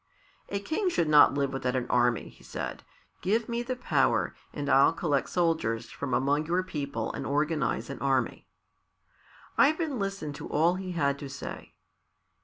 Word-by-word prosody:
"A 200 - -1
king 340 - -1
should 170 - +1
not 150 -2 +7
live 140 -1 0
without 130 -1 -1
an 125 -2 0
army," 120 -2 +2
he - - -19
said. - - -5 0.4
"Give 220 +5 +1
me 235 0 -1
the 255 +1 -3
power, 250 - +1 0.2
and 145 -1 -4
I'll 135 +3 +5
collect 150 -4 0
soldiers 160 -10 0
from 140 -2 -5
among 145 +4 +1
your 180 +2 +1
people 140 -10 -4
and - - -4
organize 150 -2 0
an - - -7
army." 135 -2 0 1.1
Ivan 310 -4 +3
listened 195 -7 -3
to - - -7
all 165 +4 +3
he 185 0 -5
had 140 -4 0
to 140 - -7
say. 140 +1 -8
150 Hz, 165 wpm, -28 LUFS, 140-185 Hz, 1.1 s, not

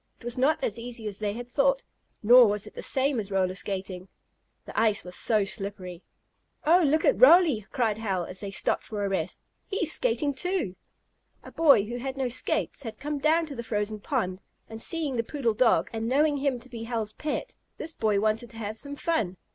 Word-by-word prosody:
It - - -16
was 240 0 -3
not 275 +4 +3
as 225 - -1
easy 230 -2 -5
as 200 -2 -6
they 205 -1 -1
had 240 +2 -7
thought 275 +1 +2 0.4
nor 240 +2 +8
was 205 0 0
it 210 - -11
the - - -7
same 270 -1 0
as 205 -2 -4
roller 190 -2 +1
skating. 190 -1 -5 0.6
The - - -3
ice 220 -2 +2
was 180 0 -8
so 215 -3 +1
slippery. 195 -3 -6 0.6
"Oh, 345 +4 +6
look 310 +1 +2
at - - +2
Roly!" 335 - +6
cried 225 -5 0
Hal, 195 -5 -1
when - - -8
they 200 - -4
had 195 - -6
stopped - - 0
for 205 -2 -4
a - - -1
rest. 185 -2 -2 0.3
"He's 350 -6 0
skating, 335 -13 +1
too." 355 - -2 0.7
A - - -11
boy 280 -11 +5
who 240 +3 -5
had 265 +2 -5
no 260 -2 -1
skates 245 - -1
had 225 -5 -7
come 295 0 -3
down 320 +3 +3
to 295 -3 -8
the 235 - -4
frozen 215 -2 -2
pond, 195 -7 -2 0.3
and, 225 0 -7
seeing 305 -5 -1
the 230 - +1
poodle 240 -3 -1
dog, 230 +2 +3
and 225 0 -2
knowing 290 +2 +3
him 275 -3 0
to 255 - -10
be 230 -2 -7
Hal's 225 -3 -2
pet, 305 - -4 0.2
this 325 +1 -5
boy 215 -6 +1
wanted 220 +3 0
to 225 - -12
have 215 0 -3
some 285 0 -4
fun. 225 - -1
230 Hz, 215 wpm, -27 LUFS, 210-280 Hz, 0.7 s, nor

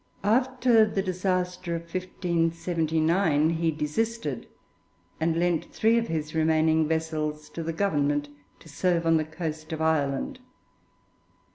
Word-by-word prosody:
After 245 +1 +4
the 205 -2 0
disaster 180 -1 -1
of 165 - -5
1579 165 -2 0
he 165 0 0
desisted, 155 - -2 0.7
and 160 0 +1
lent 175 -2 +1
three 225 +2 +2
of 230 - -3
his 155 -2 -3
remaining 160 0 +3
vessels 155 -1 -2
to 170 - -5
the 165 0 -2
Government, 145 -5 0 0.3
to - - -15
serve 170 +2 0
on 165 0 +4
the 155 - +1
coast 155 -1 -6
of 160 - -3
Ireland. 160 - 0
165 Hz, 125 wpm, -26 LUFS, 155-185 Hz, 0.7 s, After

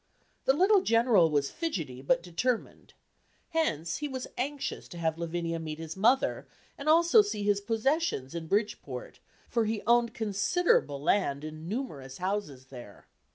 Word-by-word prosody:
The 265 - +5
little 380 +6 +4
General 230 - +4
was 145 -2 0
fidgety, 160 - -4
but 170 +5 +1
determined; 220 +8 -3 0.5
hence 170 - -1
he 300 - -3
was 260 -2 -5
anxious 280 +2 -3
to 175 - -10
have 160 -1 -1
Lavinia 170 0 -2
meet 155 -1 -5
his 160 0 -7
mother, 235 +7 +2 0.3
and 285 +2 -3
also 340 +7 +6
see 410 - -3
his 205 0 +2
possessions 225 - 0
in 165 -1 -5
Bridgeport, 210 - -2 0.3
for 230 -2 +1
he 215 0 -2
owned 235 0 +3
considerable 210 - +1
land 145 -2 +1
and 155 +2 -7
numerous 145 - -5
houses 180 -9 -3
there. 120 -6 -11
200 Hz, 150 wpm, -29 LUFS, 160-260 Hz, 0.5 s, also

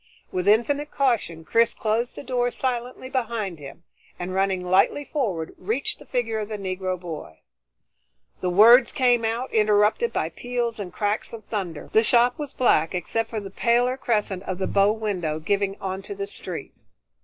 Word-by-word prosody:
With 180 +1 -2
infinite 280 +8 +3
caution 225 - 0
Chris 230 +6 +3
closed 225 +2 -1
the - - -8
door 245 -2 0
silently 250 0 -3
behind 230 - -2
him, 140 +4 -11 0.3
and 180 +1 -5
running 190 -1 0
lightly 195 +10 +3
forward, 200 - -2
reached 225 +9 -2
the - - -14
figure 230 -3 -1
of 210 0 -4
the 215 - -4
Negro 185 -1 -3
boy. 160 - -8 1.0
The 180 - -1
words 230 +7 +7
came 245 -3 +3
out, 230 +3 -2
interrupted 210 - +3
by - - -1
peals 240 -2 -3
and 190 -3 -5
cracks 205 +2 -2
of 220 -3 -9
thunder. 180 -8 -5
The 220 - +6
shop 240 +3 +3
was 295 -2 -4
black 185 - +2
except 225 +5 -2
for 220 - -3
the 195 -2 -8
paler 240 +4 +2
crescent 210 -7 -1
of 185 - -3
the 190 - -1
bow 200 +1 +3
window 195 -8 -2
giving 195 +4 -1
onto 190 - -5
the 400 0 -3
street. - - -7
215 Hz, 170 wpm, -24 LUFS, 185-245 Hz, 1.0 s, words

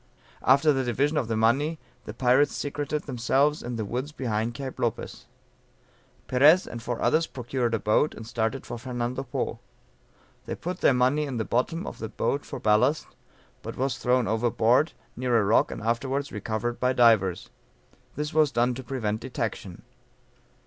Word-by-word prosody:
After 140 +3 +4
the 135 -1 0
division 135 +5 0
of 125 - 0
the 115 -1 -1
money 135 +9 +2 0.3
the 105 - -6
pirates 130 +4 +3
secreted 145 +1 -3
themselves 135 +3 +1
in 120 0 -5
the 110 -2 -3
woods 125 +8 -4
behind 115 -4 -2
Cape 135 0 -6
Lopez. 115 -3 -3 1.0
Perez 150 +8 +5
and 120 - -7
four 120 0 -4
others 160 +1 +2
procured 120 -2 -2
a - - -2
boat, 110 +9 +2
and 110 - -9
started 115 +3 -2
for 120 - -6
Fernando 125 +1 -3
Po; 130 -2 -3 0.9
they - - -3
put 180 +2 -5
their 135 - +4
money 130 +5 +2
in 135 -4 -4
the 110 - -1
bottom 165 +9 -1
of - - -7
the 110 - -5
boat 140 +5 -1
for - - -7
ballast, 105 +8 +2 0.6
but - - -7
was 135 -1 -1
thrown 125 -1 +2
overboard, 115 +6 +2 0.2
near 125 -1 +1
a 110 - +3
rock 105 - +3
and - - -7
afterwards 135 +5 -1
recovered 110 +3 -3
by 125 +1 +2
divers; 110 -7 +3 0.6
this 150 +1 -3
was 155 -2 +3
done 120 0 +1
to 130 +2 -7
prevent 115 -4 -2
detection. - - -5
125 Hz, 170 wpm, -26 LUFS, 115-140 Hz, 1.0 s, Perez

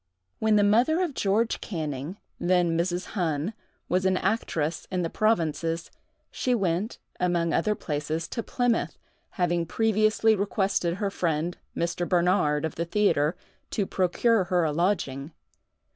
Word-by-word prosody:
When 220 -1 +3
the 205 - +5
mother 240 - +4
of 335 -6 -2
George 220 +1 +1
Canning, 155 -1 -4 0.2
then 175 -2 +2
Mrs. 175 +2 -1
Hunn, 165 +1 -1 0.3
was 185 +1 +1
an 190 0 +2
actress 165 -9 -1
in 185 -2 -1
the 165 - -2
provinces, 165 -6 0 0.4
she 250 -1 0
went, 190 0 -1 0.2
among 175 -2 +1
other 210 +5 +1
places, 155 0 -3
to 230 - -3
Plymouth, 245 0 0 0.4
having 175 -2 +1
previously 220 +2 +3
requested 195 -3 0
her 200 0 -2
friend, 165 -1 -1 0.2
Mr. 170 +1 -1
Bernard, 170 -4 +2
of 160 - -3
the 170 - -2
theatre, 170 -5 +2 0.3
to 205 - -1
procure 190 +3 +2
her 180 -1 +2
a 155 - +1
lodging. 150 -4 -1
180 Hz, 140 wpm, -27 LUFS, 165-210 Hz, 0.4 s, the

